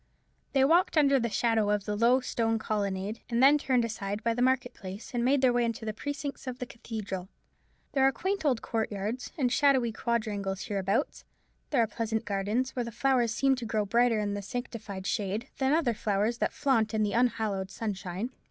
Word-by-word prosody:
They 270 Hz, -1 st, +5 dB
walked 335 Hz, +3 st, +3 dB
under 280 Hz, -2 st, +5 dB
the 235 Hz, -1 st, -1 dB
shadow 225 Hz, -2 st, +1 dB
of 210 Hz, -1 st, 0 dB
a 210 Hz, -, 0 dB
low 235 Hz, +5 st, +4 dB
stone 225 Hz, -2 st, 0 dB
colonnade, 205 Hz, -1 st, -2 dB
and 235 Hz, +2 st, +2 dB
then 290 Hz, +2 st, +7 dB
turned 255 Hz, -4 st, +2 dB
aside 205 Hz, -2 st, -4 dB
by 230 Hz, -, +2 dB
the 245 Hz, -, -2 dB
market 255 Hz, 0 st, +2 dB
place, 195 Hz, +5 st, -9 dB
and 240 Hz, -1 st, 0 dB
made 270 Hz, +2 st, +3 dB
their 255 Hz, -2 st, +4 dB
way 240 Hz, 0 st, +2 dB
into 230 Hz, -1 st, -2 dB
the 215 Hz, -, -2 dB
precincts 285 Hz, +3 st, -5 dB
of 250 Hz, -1 st, -4 dB
the 250 Hz, -, -4 dB
cathedral. 205 Hz, -6 st, -6 dB, 0.6 s
There 270 Hz, -, +2 dB
are 270 Hz, -, +5 dB
quaint 380 Hz, +6 st, -2 dB
old 260 Hz, -6 st, +1 dB
courtyards, 220 Hz, +2 st, -3 dB
and 255 Hz, -5 st, +1 dB
shadowy 265 Hz, -5 st, +3 dB
quadrangles 210 Hz, -4 st, -2 dB
hereabouts; 200 Hz, +6 st, -1 dB, 0.5 s
there 255 Hz, -6 st, +3 dB
are -, -, 0 dB
pleasant 220 Hz, +1 st, -2 dB
gardens, 210 Hz, +6 st, -1 dB
where 245 Hz, -, 0 dB
the 235 Hz, -, -6 dB
flowers 245 Hz, -1 st, +2 dB
seem 270 Hz, +3 st, +2 dB
to 245 Hz, -, -5 dB
grow 215 Hz, -2 st, 0 dB
brighter 235 Hz, +2 st, +3 dB
in 205 Hz, -1 st, -1 dB
the 205 Hz, -, -3 dB
sanctified 215 Hz, -4 st, -6 dB
shade 205 Hz, +3 st, -2 dB
than 265 Hz, 0 st, +2 dB
other 300 Hz, -6 st, +2 dB
flowers 215 Hz, +2 st, 0 dB
that -, -, +1 dB
flaunt 230 Hz, -6 st, +1 dB
in 215 Hz, -, +2 dB
the 205 Hz, -, 0 dB
unhallowed 220 Hz, -5 st, 0 dB
sunshine. 195 Hz, +1 st, -4 dB
230 Hz, 200 wpm, -29 LUFS, 210-255 Hz, 0.6 s, then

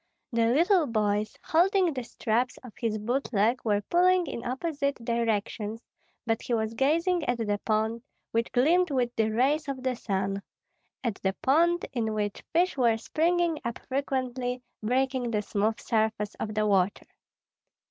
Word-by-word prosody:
The 230 Hz, -1 st, +3 dB
little 335 Hz, -, +4 dB
boys, 210 Hz, -2 st, 0 dB
holding 365 Hz, +1 st, +3 dB
the 255 Hz, -2 st, -4 dB
straps 240 Hz, +2 st, -1 dB
of 250 Hz, -4 st, -11 dB
his 225 Hz, -3 st, -1 dB
boot 245 Hz, +6 st, -2 dB
leg, 225 Hz, +3 st, +2 dB
were 205 Hz, -2 st, +1 dB
pulling 360 Hz, -, +3 dB
in 235 Hz, -, -5 dB
opposite 280 Hz, +2 st, -1 dB
directions; 225 Hz, -2 st, -2 dB, 0.5 s
but 225 Hz, -1 st, 0 dB
he 240 Hz, -, -1 dB
was 220 Hz, 0 st, -1 dB
gazing 330 Hz, +7 st, +2 dB
at 245 Hz, -, 0 dB
the 205 Hz, -3 st, -1 dB
pond, 220 Hz, +1 st, 0 dB, 0.3 s
which 230 Hz, +1 st, 0 dB
gleamed 335 Hz, +8 st, +3 dB
with 245 Hz, -3 st, 0 dB
the 220 Hz, -1 st, +2 dB
rays 275 Hz, +8 st, +1 dB
of 265 Hz, -2 st, -4 dB
the 255 Hz, -1 st, 0 dB
sun, 195 Hz, -2 st, -2 dB, 0.6 s
at 230 Hz, -5 st, -2 dB
the 190 Hz, 0 st, +1 dB
pond, 340 Hz, +6 st, +3 dB
in 220 Hz, -3 st, -1 dB
which 205 Hz, -1 st, -2 dB
fish 355 Hz, +3 st, +2 dB
were 230 Hz, -3 st, +4 dB
springing 330 Hz, +6 st, +1 dB
up 235 Hz, -1 st, -3 dB
frequently, 255 Hz, -2 st, -2 dB, 0.2 s
breaking 255 Hz, +2 st, 0 dB
the 210 Hz, -2 st, 0 dB
smooth 215 Hz, +2 st, 0 dB
surface 220 Hz, -2 st, 0 dB
of 215 Hz, -1 st, -4 dB
the 215 Hz, 0 st, +2 dB
water. 195 Hz, -1 st, +1 dB
240 Hz, 155 wpm, -28 LUFS, 220-280 Hz, 0.6 s, little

